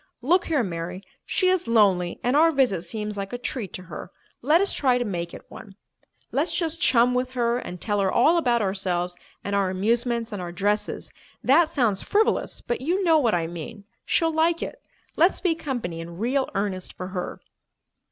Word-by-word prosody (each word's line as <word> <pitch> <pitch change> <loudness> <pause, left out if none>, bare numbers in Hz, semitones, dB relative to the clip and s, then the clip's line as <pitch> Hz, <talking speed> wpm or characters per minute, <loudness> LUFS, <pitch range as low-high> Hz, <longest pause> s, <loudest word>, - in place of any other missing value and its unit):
Look 355 +7 +3
here, 295 -7 +1
Mary, 180 0 -5 0.2
she 370 - +1
is 370 -7 +2
lonely 195 -6 +3
and 245 +3 +1
our 325 +2 +6
visit 255 - +2
seems 210 +4 -4
like 195 +1 -5
a - - -1
treat 240 -5 -4
to 185 - -7
her. 185 - -8 0.3
Let 300 +7 +4
us 395 +1 +1
try 255 -3 +2
to 245 - -1
make 170 -4 -3
it - - -11
one. 195 -3 -12 0.6
Let's - - 0
just 330 0 -1
chum 250 -5 +4
with 250 +1 -1
her 240 -1 +1
and 180 -7 -7
tell 205 +1 -1
her 195 -1 +2
all 315 +8 +4
about 240 -8 +2
ourselves 180 -2 -1 0.3
and 200 0 -2
our 195 -2 +2
amusements 230 +4 0
and 205 -3 -4
our 175 -1 -5
dresses. 205 +4 -1 0.3
That 315 +5 +5
sounds 235 - +1
frivolous, 430 +2 +1
but 240 - -3
you 355 +8 0
know 325 -3 +5
what 235 -9 +2
I 170 -1 0
mean. 170 +5 -7 0.2
She'll 325 -1 +1
like 330 +1 +2
it. - - -7 0.4
Let's 345 +5 +4
be 360 -3 +2
company 245 - -4
in 170 +1 -8
real 260 +6 0
earnest 195 -2 -2
for 185 - -6
her." 180 -2 -5
230 Hz, 195 wpm, -25 LUFS, 190-285 Hz, 0.6 s, our